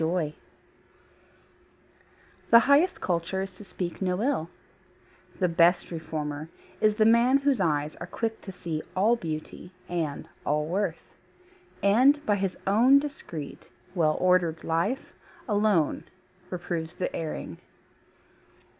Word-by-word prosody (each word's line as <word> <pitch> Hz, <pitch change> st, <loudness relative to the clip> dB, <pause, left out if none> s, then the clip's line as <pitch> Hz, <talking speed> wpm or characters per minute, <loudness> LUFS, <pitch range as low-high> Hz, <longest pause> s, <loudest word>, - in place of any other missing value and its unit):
TRUE 160 Hz, -, +2 dB
CULTURE 165 Hz, -3 st, -1 dB, 2.2 s
The 230 Hz, -, +9 dB
highest 285 Hz, +8 st, +3 dB
culture 175 Hz, +2 st, -1 dB
is 195 Hz, -1 st, -8 dB
to 210 Hz, -, -11 dB
speak 180 Hz, -3 st, -5 dB
no 180 Hz, -1 st, 0 dB
ill, 245 Hz, -, 0 dB, 0.9 s
The 185 Hz, -, +2 dB
best 175 Hz, +1 st, +3 dB
reformer 155 Hz, -2 st, -4 dB, 0.3 s
is 215 Hz, -1 st, +4 dB
the 215 Hz, 0 st, +3 dB
man 235 Hz, +4 st, +5 dB
whose 275 Hz, -5 st, +1 dB
eyes 150 Hz, -3 st, 0 dB
Are -, -, -7 dB
quick 225 Hz, -1 st, -3 dB
to 195 Hz, -, -8 dB
see 170 Hz, -4 st, -4 dB
all 210 Hz, +6 st, +4 dB
beauty 165 Hz, -2 st, -6 dB, 0.2 s
and 165 Hz, -5 st, -3 dB, 0.2 s
all 150 Hz, +1 st, 0 dB
worth; 195 Hz, +6 st, -3 dB, 0.7 s
And 260 Hz, +9 st, +4 dB
by 205 Hz, -1 st, +2 dB
his 195 Hz, -2 st, -2 dB
own 235 Hz, +8 st, +6 dB
discreet, 275 Hz, -, -5 dB, 0.3 s
well 160 Hz, -4 st, +2 dB
ordered 180 Hz, -3 st, +2 dB
life, 175 Hz, -, -1 dB, 0.3 s
Alone 205 Hz, -, +1 dB, 0.4 s
reproves 170 Hz, -2 st, -4 dB
the 180 Hz, -, -3 dB
erring. 155 Hz, -, -5 dB
180 Hz, 125 wpm, -27 LUFS, 160-215 Hz, 2.2 s, The